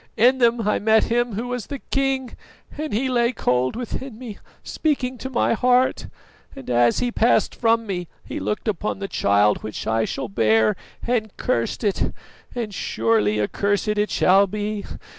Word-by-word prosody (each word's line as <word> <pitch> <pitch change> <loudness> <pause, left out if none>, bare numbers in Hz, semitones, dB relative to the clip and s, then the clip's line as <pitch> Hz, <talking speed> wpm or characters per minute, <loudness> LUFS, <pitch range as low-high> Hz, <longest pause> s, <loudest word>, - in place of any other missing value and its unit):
In 250 +4 +4
them 235 -3 +2
I 210 - +2
met 220 +1 +4
him 240 -1 +1
who 230 +4 -3
was 245 -4 -4
the 280 - -5
king, 270 -2 -1 0.4
and 310 +1 -4
he 240 +6 0
lay 240 -1 +2
cold 130 - 0
within 245 0 -5
me, 230 -4 -8 0.2
speaking 265 -5 -1
to 260 - -5
my 240 -2 +1
heart; 250 +2 +2 0.5
and 135 - -10
as 120 -1 +3
he 245 -1 0
passed 235 +1 +2
from 230 -1 +1
me 180 -4 -4 0.2
he - - -5
looked 210 - -3
upon 210 0 -1
the 195 0 -4
child 100 - +2
which 110 - -6
I 110 0 +1
shall - - -4
bear 110 - +2 0.3
and 225 -4 -1
cursed 115 - -1
it, 205 -3 0 0.4
and 225 -4 -3
surely 110 - +1
accursed 200 - 0
it 210 0 +1
shall 195 +2 +4
be. 210 +1 -4
215 Hz, 170 wpm, -22 LUFS, 180-245 Hz, 0.5 s, In